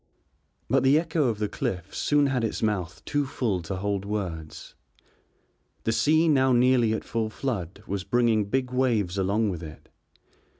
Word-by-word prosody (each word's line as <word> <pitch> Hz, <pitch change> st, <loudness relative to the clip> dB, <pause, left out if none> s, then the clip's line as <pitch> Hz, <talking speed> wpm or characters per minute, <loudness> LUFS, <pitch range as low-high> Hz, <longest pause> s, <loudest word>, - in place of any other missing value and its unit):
But 135 Hz, +3 st, +3 dB
the 135 Hz, +3 st, +5 dB
echo 160 Hz, -2 st, 0 dB
of 115 Hz, -3 st, -1 dB
the 105 Hz, 0 st, -1 dB
cliff 90 Hz, -3 st, -4 dB
soon 145 Hz, -1 st, +2 dB
had 130 Hz, -4 st, 0 dB
its 110 Hz, -, -2 dB
mouth 95 Hz, -5 st, -2 dB
too 145 Hz, -1 st, 0 dB
full 115 Hz, -9 st, -1 dB
to 85 Hz, +4 st, -5 dB
hold 100 Hz, +1 st, -2 dB
words. 90 Hz, -7 st, -5 dB, 1.1 s
The 115 Hz, -, +1 dB
sea 155 Hz, +7 st, +3 dB
now 135 Hz, -4 st, +4 dB
nearly 120 Hz, -2 st, +4 dB
at 110 Hz, -, -3 dB
full 110 Hz, -1 st, -2 dB
flood 105 Hz, -, -4 dB
was 100 Hz, -1 st, -3 dB
bringing 115 Hz, -2 st, +2 dB
big 125 Hz, +4 st, -1 dB
waves 110 Hz, -8 st, +1 dB
along 100 Hz, +3 st, +1 dB
with 85 Hz, -3 st, -6 dB
it. 80 Hz, -2 st, -11 dB
110 Hz, 165 wpm, -26 LUFS, 95-130 Hz, 1.1 s, the